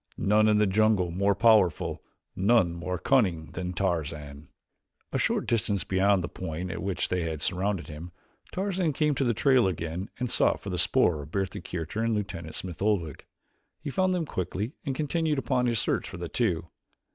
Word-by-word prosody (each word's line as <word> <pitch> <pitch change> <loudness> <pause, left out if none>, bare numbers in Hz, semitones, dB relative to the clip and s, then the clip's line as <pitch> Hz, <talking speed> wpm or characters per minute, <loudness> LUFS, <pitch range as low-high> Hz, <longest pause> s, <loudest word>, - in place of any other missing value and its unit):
None 105 +2 +3
in 105 -1 +4
the 105 - +4
jungle 100 -2 +2
more 100 +3 +1
powerful, 105 -6 +3 0.3
none 95 -3 +3
more 85 +2 -3
cunning 90 -7 +1
than 90 -1 -4
Tarzan!" 75 -5 -3 0.6
A - - 0
short - - +1
distance 105 -4 0
beyond 95 0 +2
the - - -2
point 90 +1 -5
at 85 - -5
which 95 0 -2
they 90 -1 0
had 80 -2 -3
surrounded 95 -3 0
him, 80 +3 -9 0.4
Tarzan 185 -4 -1
came 150 +2 +1
to 135 - 0
the 120 -3 +1
trail 130 -3 +4
again 85 +1 -4
and 125 - -2
sought - - +2
for - - -6
the - - -2
spoor 80 -4 +3
of 70 - -10
Bertha 95 +1 -2
Kircher 90 +5 -4
and 115 -1 +1
Lieutenant 95 -6 -5
Smith 90 -2 -6
Oldwick. 95 -8 -1 0.5
He 140 - -5
found 185 +4 +1
them 180 -3 0
quickly 95 - -3
and 135 - -2
continued 155 +1 0
upon 125 -1 +1
his 120 -1 +1
search - - 0
for - - -8
the 85 -1 -5
two. 85 -9 -1
95 Hz, 185 wpm, -27 LUFS, 85-115 Hz, 0.6 s, in